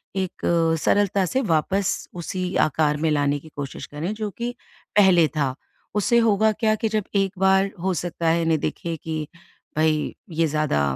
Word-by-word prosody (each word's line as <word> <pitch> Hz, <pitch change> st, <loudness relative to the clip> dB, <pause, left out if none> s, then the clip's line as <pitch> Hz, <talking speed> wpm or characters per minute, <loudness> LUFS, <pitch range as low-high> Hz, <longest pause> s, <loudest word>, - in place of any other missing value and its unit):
एक 190 Hz, -2 st, -3 dB, 0.4 s
सरलता 200 Hz, +2 st, +2 dB
से 260 Hz, +9 st, 0 dB
वापस 190 Hz, -, 0 dB
उसी 180 Hz, +1 st, -3 dB
आकार 150 Hz, 0 st, +1 dB
में 160 Hz, +1 st, 0 dB
लाने 145 Hz, -1 st, +1 dB
की 160 Hz, -, -14 dB
कोशिश 140 Hz, -2 st, -6 dB
करें, 160 Hz, +7 st, -4 dB
जो 215 Hz, -1 st, -3 dB
कि 240 Hz, +4 st, -4 dB, 0.4 s
पहले 185 Hz, -5 st, +6 dB
था। 135 Hz, -3 st, 0 dB, 0.4 s
उससे 210 Hz, +3 st, +3 dB
होगा 220 Hz, -1 st, +3 dB
क्या 215 Hz, 0 st, +1 dB
कि 220 Hz, +1 st, -1 dB
जब 215 Hz, -1 st, 0 dB
एक 195 Hz, -1 st, +2 dB
बार 190 Hz, 0 st, +3 dB
हो 190 Hz, 0 st, +1 dB
सकता 170 Hz, 0 st, -3 dB
है, 165 Hz, +1 st, +2 dB
इन्हें 165 Hz, -1 st, +2 dB
दिखे 170 Hz, +3 st, -3 dB
कि, 155 Hz, -1 st, -4 dB, 0.5 s
"भई, 155 Hz, -1 st, +1 dB
ये 165 Hz, -1 st, +1 dB
ज़्यादा 150 Hz, -, 0 dB
175 Hz, 170 wpm, -23 LUFS, 155-200 Hz, 0.5 s, पहले